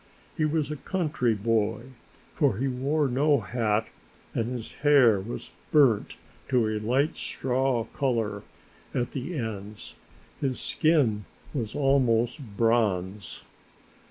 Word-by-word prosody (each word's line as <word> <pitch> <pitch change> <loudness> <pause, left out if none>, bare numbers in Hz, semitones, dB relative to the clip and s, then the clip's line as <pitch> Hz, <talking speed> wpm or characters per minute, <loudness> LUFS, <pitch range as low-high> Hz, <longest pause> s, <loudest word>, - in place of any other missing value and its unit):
He 155 - +1
was 150 -1 0
a 150 - -4
country 145 - 0
boy, 110 +3 0 0.4
for 140 - +2
he 135 +4 0
wore 140 +4 0
no 140 +1 +2
hat 110 0 0 0.5
and 115 +2 -1
his 120 -3 -5
hair 135 -8 +6
was 105 +5 -7 0.2
burnt 135 -9 +3 0.3
to 120 -4 +3
a 110 0 -1
light 130 +9 +1
straw 130 -2 0
color 115 -6 -1 0.5
at 120 0 -1
the 150 +5 -4
ends, 105 -3 -5 0.5
his 130 -3 -1
skin 130 - +2 0.3
was 115 -7 -3
almost 130 -3 +2 0.2
bronze. 105 -4 0
120 Hz, 120 wpm, -27 LUFS, 110-140 Hz, 0.5 s, hair